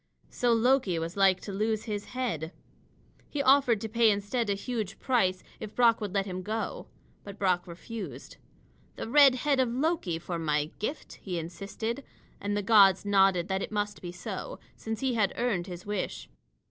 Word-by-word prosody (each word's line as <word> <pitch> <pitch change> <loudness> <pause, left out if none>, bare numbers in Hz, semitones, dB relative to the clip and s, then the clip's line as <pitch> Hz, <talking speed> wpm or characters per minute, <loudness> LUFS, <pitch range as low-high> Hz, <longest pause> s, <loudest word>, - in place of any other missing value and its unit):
So 245 -1 +1
Loki 230 -5 +3
was 165 +2 -4
like 195 -2 +4
to 205 - -6
lose 215 +2 -1
his 210 -2 -4
head. 220 - -3 0.8
He 285 -1 -1
offered 265 -5 +5
to 225 - -3
pay 230 +1 +4
instead 205 +3 0
a 200 - +2
huge 215 -2 -4
price, 190 -8 +1 0.2
if 215 -1 -8
Brock 235 -2 +4
would 205 -3 -3
let 195 0 0
him 185 -2 -5
go. 220 +4 -4 0.4
But 200 0 -9
Brock 180 -3 +1
refused. 170 - -8 0.6
"The - - -5
red 275 +1 +7
head 280 +1 +1
of 255 -2 +3
Loki 255 - 0
for 170 +1 -5
my 150 -1 0
gift," 275 +9 -5
he 180 -3 -4
insisted, 195 - -5 0.4
and 205 +1 -2
the 205 - -1
gods 195 -3 +6
nodded 195 -3 +3
that 190 0 0
it - - -4
must 205 -1 -2
be 175 - -6
so, 180 - -6 0.2
since 225 +1 -5
he 265 -2 +1
had 215 -4 +1
earned 210 -7 -1
his 180 -1 -8
wish. 205 -2 -3
205 Hz, 180 wpm, -29 LUFS, 185-235 Hz, 0.8 s, red